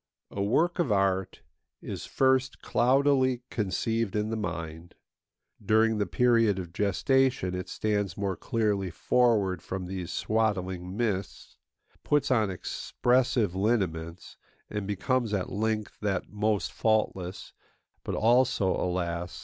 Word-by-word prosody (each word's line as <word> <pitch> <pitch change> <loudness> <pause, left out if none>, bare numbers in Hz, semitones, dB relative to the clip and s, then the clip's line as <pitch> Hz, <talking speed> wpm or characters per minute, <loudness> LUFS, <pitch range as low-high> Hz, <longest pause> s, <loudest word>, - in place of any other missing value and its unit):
A 100 - -4
work 160 - +1
of 155 -10 +1
art 95 -2 0 0.4
is - - -6
first 130 0 +2
cloudily 130 0 +2
conceived 110 0 -1
in 105 +1 -1
the - - -1
mind; 85 -4 -5 0.7
during 110 +1 +3
the 105 - 0
period 115 -5 +3
of 90 -3 -6
gestation 105 +1 +1
it 90 0 -5
stands 105 -4 -1
more 100 -2 -1
clearly 105 -4 -1
forward 100 0 +2
from 95 -1 -5
these 90 -1 -5
swaddling 95 -4 -1
mists, 105 -5 -3 0.4
puts 145 -2 +1
on 110 -5 +3
expressive 120 +2 0
lineaments, 95 -5 -2 0.3
and 105 -2 -3
becomes 115 +2 0
at 95 - -3
length 110 +1 -2
that 100 -3 -2
most 105 0 0
faultless, 100 -4 -1 0.5
but - - -3
also, 120 -4 +3
alas! 85 -1 -2
105 Hz, 120 wpm, -28 LUFS, 95-115 Hz, 0.7 s, during